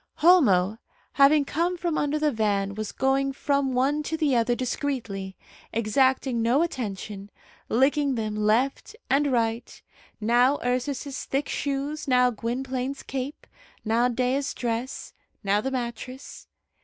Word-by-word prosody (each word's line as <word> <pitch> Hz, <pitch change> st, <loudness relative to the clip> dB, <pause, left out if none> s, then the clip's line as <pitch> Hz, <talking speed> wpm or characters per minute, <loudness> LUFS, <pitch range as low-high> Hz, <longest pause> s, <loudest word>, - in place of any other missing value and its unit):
Homo, 225 Hz, -, +4 dB, 0.3 s
having 285 Hz, +1 st, +5 dB
come 345 Hz, +5 st, -1 dB
from 340 Hz, -2 st, -1 dB
under 290 Hz, 0 st, 0 dB
the 305 Hz, -1 st, +1 dB
van, 200 Hz, -4 st, 0 dB
was 215 Hz, 0 st, -4 dB
going 270 Hz, +1 st, +1 dB
from 280 Hz, -1 st, 0 dB
one 280 Hz, +4 st, +2 dB
to 320 Hz, +2 st, -3 dB
the 300 Hz, -5 st, +2 dB
other 240 Hz, +1 st, +2 dB
discreetly, 240 Hz, -7 st, -3 dB, 0.3 s
exacting 250 Hz, +2 st, +1 dB
no 245 Hz, +7 st, +3 dB
attention, 205 Hz, -, -5 dB, 0.4 s
licking 275 Hz, +3 st, +2 dB
them 215 Hz, -2 st, -2 dB
left 230 Hz, -, 0 dB, 0.2 s
and 285 Hz, +1 st, +3 dB
right 230 Hz, -1 st, -1 dB, 0.4 s
now 245 Hz, +5 st, +3 dB
Ursus's 255 Hz, +2 st, -2 dB
thick 275 Hz, +2 st, -1 dB
shoes, 285 Hz, +2 st, -3 dB
now 250 Hz, -1 st, +4 dB
Gwynplaine's 255 Hz, +4 st, -3 dB
cape, 270 Hz, +2 st, -5 dB, 0.4 s
now 230 Hz, +3 st, +3 dB
Dea's 255 Hz, +3 st, -1 dB
dress, 240 Hz, +2 st, -4 dB, 0.3 s
now 200 Hz, +1 st, +2 dB
the 265 Hz, -, -2 dB
mattress. 255 Hz, +1 st, -6 dB
255 Hz, 130 wpm, -26 LUFS, 230-280 Hz, 0.4 s, having